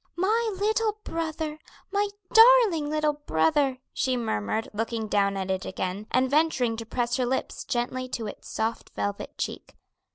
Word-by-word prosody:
"My 435 Hz, +5 st, +1 dB
little 435 Hz, +1 st, +1 dB
brother! 315 Hz, -2 st, -3 dB, 0.3 s
my 405 Hz, +1 st, +1 dB, 0.2 s
darling 450 Hz, -10 st, +7 dB
little 305 Hz, 0 st, +1 dB
brother," 265 Hz, -, +1 dB, 0.2 s
she 255 Hz, -1 st, 0 dB
murmured 220 Hz, -, -1 dB
looking 225 Hz, +1 st, -2 dB
down 200 Hz, -1 st, +1 dB
at 190 Hz, 0 st, -2 dB
it 190 Hz, 0 st, -1 dB
again, 190 Hz, +3 st, -4 dB
and 255 Hz, +1 st, +2 dB
venturing 270 Hz, -5 st, +2 dB
to 225 Hz, -1 st, -6 dB
press 240 Hz, 0 st, -1 dB
her 255 Hz, -, +1 dB
lips 265 Hz, -, -2 dB
gently 255 Hz, +1 st, -2 dB
to 230 Hz, -2 st, -3 dB
its 205 Hz, -, -8 dB
soft 220 Hz, +1 st, -2 dB
velvet 205 Hz, 0 st, -3 dB
cheek. -, -, -5 dB
255 Hz, 155 wpm, -27 LUFS, 220-325 Hz, 0.3 s, darling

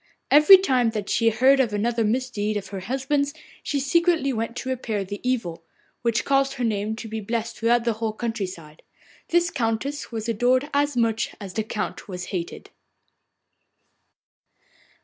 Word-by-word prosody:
Every 300 Hz, +7 st, +9 dB
time 260 Hz, -11 st, +2 dB
that 205 Hz, -2 st, -4 dB
she 230 Hz, -, +3 dB
heard 260 Hz, +5 st, +4 dB
of 240 Hz, -5 st, +1 dB
another 230 Hz, +2 st, 0 dB
misdeed 215 Hz, -2 st, -1 dB
of 195 Hz, -2 st, -6 dB
her 195 Hz, -, -5 dB
husband's 270 Hz, +7 st, -1 dB, 0.3 s
she 285 Hz, -, -2 dB
secretly 320 Hz, 0 st, +2 dB
went 230 Hz, +1 st, -3 dB
to 260 Hz, -, -5 dB
repair 230 Hz, -5 st, -2 dB
the 200 Hz, +1 st, -6 dB
evil, 225 Hz, -10 st, -2 dB, 0.4 s
which 235 Hz, -2 st, 0 dB
caused 275 Hz, 0 st, +2 dB
her 250 Hz, -, -4 dB
name 215 Hz, -1 st, -1 dB
to 225 Hz, -, -7 dB
be 220 Hz, 0 st, -4 dB
blessed 230 Hz, +2 st, -3 dB
throughout 235 Hz, +1 st, +2 dB
the 235 Hz, -1 st, +1 dB
whole 220 Hz, 0 st, -3 dB
country 225 Hz, -3 st, -3 dB
side. 160 Hz, -4 st, -12 dB, 0.5 s
This 345 Hz, 0 st, +2 dB
Countess 240 Hz, +5 st, -2 dB
was 225 Hz, -1 st, -4 dB
adored 250 Hz, +5 st, +1 dB
as 285 Hz, -2 st, +1 dB
much 225 Hz, -2 st, 0 dB
as 195 Hz, -3 st, -8 dB
the 220 Hz, -, -1 dB
Count 215 Hz, 0 st, -5 dB
was 180 Hz, -2 st, -6 dB
hated. 175 Hz, -2 st, -5 dB
230 Hz, 165 wpm, -24 LUFS, 215-265 Hz, 0.5 s, Every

